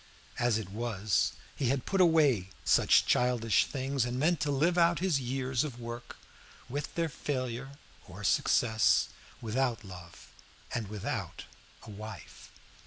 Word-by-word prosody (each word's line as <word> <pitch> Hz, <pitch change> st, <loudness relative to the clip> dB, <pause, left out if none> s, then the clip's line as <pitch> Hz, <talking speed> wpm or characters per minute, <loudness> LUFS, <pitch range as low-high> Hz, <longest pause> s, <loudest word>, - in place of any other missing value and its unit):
As 120 Hz, -3 st, +2 dB
it 100 Hz, -4 st, -6 dB
was, 110 Hz, -2 st, 0 dB, 0.2 s
he 135 Hz, -, -2 dB
had 135 Hz, -1 st, 0 dB
put 195 Hz, -1 st, +1 dB
away 145 Hz, -, +4 dB, 0.2 s
such -, -, +5 dB
childish 120 Hz, -3 st, +2 dB
things, 135 Hz, -1 st, -1 dB
and 120 Hz, +1 st, -2 dB
meant 160 Hz, +5 st, +2 dB
to 150 Hz, -, -1 dB
live 155 Hz, +5 st, +2 dB
out 170 Hz, -1 st, +4 dB
his 175 Hz, -6 st, +1 dB
years 130 Hz, 0 st, -1 dB
of 130 Hz, -6 st, -6 dB
work, 120 Hz, 0 st, -7 dB, 0.5 s
with 145 Hz, +4 st, -5 dB
their 170 Hz, -1 st, +1 dB
failure 135 Hz, -3 st, -4 dB, 0.3 s
or 95 Hz, +3 st, -10 dB
success, 110 Hz, +3 st, +3 dB, 0.3 s
without 120 Hz, +1 st, -1 dB
love 90 Hz, -3 st, -12 dB, 0.4 s
and 110 Hz, -3 st, -2 dB
without 105 Hz, -1 st, -4 dB, 0.4 s
a 110 Hz, -, -10 dB
wife. 105 Hz, -4 st, -10 dB
125 Hz, 140 wpm, -30 LUFS, 110-140 Hz, 0.5 s, such